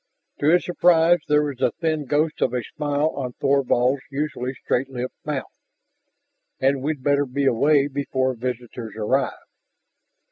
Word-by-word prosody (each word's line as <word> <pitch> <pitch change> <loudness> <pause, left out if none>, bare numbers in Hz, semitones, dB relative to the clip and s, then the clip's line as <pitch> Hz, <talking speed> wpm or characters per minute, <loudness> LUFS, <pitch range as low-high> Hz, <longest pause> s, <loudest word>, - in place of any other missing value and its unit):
To 145 - +1
his 175 +3 +4
surprise 175 -1 +4
there 150 0 +3
was 140 -4 -5
a - - +2
thin 155 -3 -1
ghost 150 +4 0
of 125 - +1
a 125 - -1
smile 145 +4 -1
on 130 -5 -5
Thorvald's 135 -1 +2
usually 135 -2 -3
straight 130 +1 -1
lipped 125 -1 -6
mouth. - - -3 1.1
"And 135 0 +2
we'd 145 -1 -3
better 145 0 +2
be 140 +2 -1
away 140 +3 +3
before 130 -2 -1
visitors 120 -2 -5
arrive?" 125 +5 0
140 Hz, 145 wpm, -23 LUFS, 125-150 Hz, 1.1 s, his